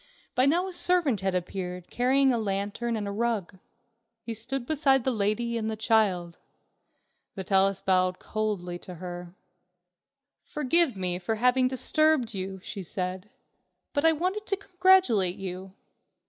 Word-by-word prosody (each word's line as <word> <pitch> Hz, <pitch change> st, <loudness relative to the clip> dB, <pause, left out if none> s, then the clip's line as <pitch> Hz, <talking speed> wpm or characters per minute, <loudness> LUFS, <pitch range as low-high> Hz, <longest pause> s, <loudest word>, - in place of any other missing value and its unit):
By 255 Hz, +2 st, +3 dB
now 350 Hz, +6 st, +2 dB
a 375 Hz, -, -6 dB
servant 345 Hz, -, +2 dB
had 190 Hz, -1 st, -1 dB
appeared, 180 Hz, 0 st, -5 dB
carrying 265 Hz, +2 st, +3 dB
a 235 Hz, -, 0 dB
lantern 205 Hz, +3 st, -2 dB
and 210 Hz, -2 st, -3 dB
a -, -, -3 dB
rug. 205 Hz, -4 st, -2 dB, 0.6 s
He 230 Hz, -, -4 dB
stood 240 Hz, +3 st, -5 dB
beside 270 Hz, -3 st, +2 dB
the 260 Hz, -, +1 dB
lady 230 Hz, +2 st, -1 dB
and 220 Hz, 0 st, -2 dB
the 220 Hz, -, -3 dB
child. 200 Hz, -6 st, +1 dB, 1.0 s
Vitalis 195 Hz, 0 st, +1 dB
bowed 185 Hz, -1 st, +2 dB
coldly 200 Hz, -5 st, -3 dB
to 180 Hz, -, -10 dB
her. 175 Hz, 0 st, -8 dB, 1.1 s
"Forgive 300 Hz, -1 st, +3 dB
me 180 Hz, -2 st, -2 dB
for 205 Hz, +5 st, -2 dB
having 250 Hz, +3 st, +3 dB
disturbed 260 Hz, -1 st, +1 dB
you," 190 Hz, 0 st, -5 dB
she 200 Hz, -, -6 dB
said, 185 Hz, +2 st, -4 dB, 0.6 s
"but 285 Hz, -, 0 dB
I 325 Hz, -, +6 dB
wanted 370 Hz, +7 st, -2 dB
to 395 Hz, -, 0 dB
congratulate 365 Hz, -, +3 dB
you." 190 Hz, 0 st, -7 dB
220 Hz, 145 wpm, -27 LUFS, 190-265 Hz, 1.1 s, I